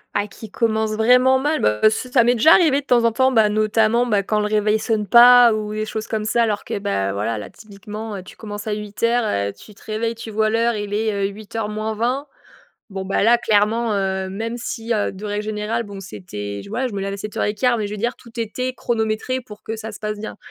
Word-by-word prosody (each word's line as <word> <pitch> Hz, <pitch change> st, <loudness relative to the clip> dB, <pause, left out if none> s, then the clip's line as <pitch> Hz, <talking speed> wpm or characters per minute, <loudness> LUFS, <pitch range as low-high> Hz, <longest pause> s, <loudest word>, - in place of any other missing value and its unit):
Ah, 205 Hz, 0 st, 0 dB
qui 215 Hz, +1 st, -11 dB
commence 220 Hz, -1 st, 0 dB
vraiment 250 Hz, +4 st, +5 dB
mal. 295 Hz, +3 st, 0 dB
Bah, 105 Hz, 0 st, +1 dB
c'est 245 Hz, +3 st, -4 dB
ça 245 Hz, -3 st, +5 dB
m'est 240 Hz, -, +4 dB
déjà 310 Hz, +8 st, +6 dB
arrivé 295 Hz, -5 st, +4 dB
de -, -, -27 dB
temps 240 Hz, -3 st, +3 dB
en 230 Hz, -, +3 dB
temps, 260 Hz, +3 st, +2 dB
bah, 220 Hz, -3 st, +4 dB
notamment, 215 Hz, +2 st, +2 dB
bah, 205 Hz, -4 st, +1 dB
quand 215 Hz, +2 st, 0 dB
le 210 Hz, -, 0 dB
réveil 215 Hz, 0 st, +1 dB
sonne 215 Hz, -1 st, -1 dB
pas 240 Hz, +1 st, +8 dB
ou 215 Hz, -1 st, -3 dB
des 215 Hz, 0 st, -2 dB
choses 220 Hz, 0 st, -5 dB
comme 215 Hz, -1 st, -2 dB
ça, 235 Hz, +2 st, +2 dB
alors 210 Hz, -2 st, -1 dB
que, -, -, -3 dB
bah, 100 Hz, -, -1 dB
voilà, 105 Hz, +3 st, -2 dB
là, 100 Hz, -, -7 dB
typiquement, 210 Hz, +1 st, -8 dB
heu, 185 Hz, -, -7 dB
tu -, -, -14 dB
commences 205 Hz, -1 st, -7 dB
à 210 Hz, -, 0 dB
8:00, 225 Hz, +3 st, -1 dB, 0.3 s
heu, -, -, -8 dB
tu 200 Hz, -, -16 dB
te -, -, -19 dB
réveilles, 225 Hz, +1 st, -2 dB
tu 225 Hz, -1 st, -8 dB
vois 215 Hz, +1 st, +1 dB
l'heure, 230 Hz, +1 st, +1 dB
il 205 Hz, -1 st, -4 dB
est, 215 Hz, 0 st, 0 dB
heu, 200 Hz, -1 st, 0 dB
7:40. 220 Hz, +5 st, -3 dB, 0.6 s
Bon 190 Hz, -2 st, -5 dB
bah, 195 Hz, +1 st, 0 dB
là 235 Hz, +1 st, +6 dB
clairement, 225 Hz, 0 st, +1 dB
heu, 190 Hz, -1 st, -1 dB
même 225 Hz, +5 st, -4 dB
si, 230 Hz, -1 st, -4 dB
heu, 210 Hz, -, 0 dB
de 195 Hz, +2 st, -10 dB
règle 205 Hz, 0 st, -2 dB
générale 215 Hz, +2 st, -2 dB
bon, 205 Hz, -3 st, -9 dB
c'était, 105 Hz, -, -7 dB
je -, -, -12 dB
ouais, 260 Hz, +1 st, -1 dB
je 220 Hz, -, -8 dB
me 200 Hz, -, -3 dB
lève 195 Hz, 0 st, -3 dB
à -, -, -4 dB
7:15 210 Hz, +4 st, -1 dB
mais, 210 Hz, -, -2 dB
je 205 Hz, -, -7 dB
veux -, -, -4 dB
dire, 240 Hz, +4 st, -1 dB
tout 235 Hz, -, -16 dB
était 250 Hz, +3 st, -3 dB
chronométré 225 Hz, +2 st, -1 dB
pour 215 Hz, -4 st, -13 dB
que 225 Hz, -, -4 dB
ça 220 Hz, 0 st, -6 dB
se 210 Hz, -, -10 dB
passe 215 Hz, -1 st, -4 dB
bien. 215 Hz, -, -6 dB
215 Hz, 245 wpm, -21 LUFS, 205-235 Hz, 0.6 s, pas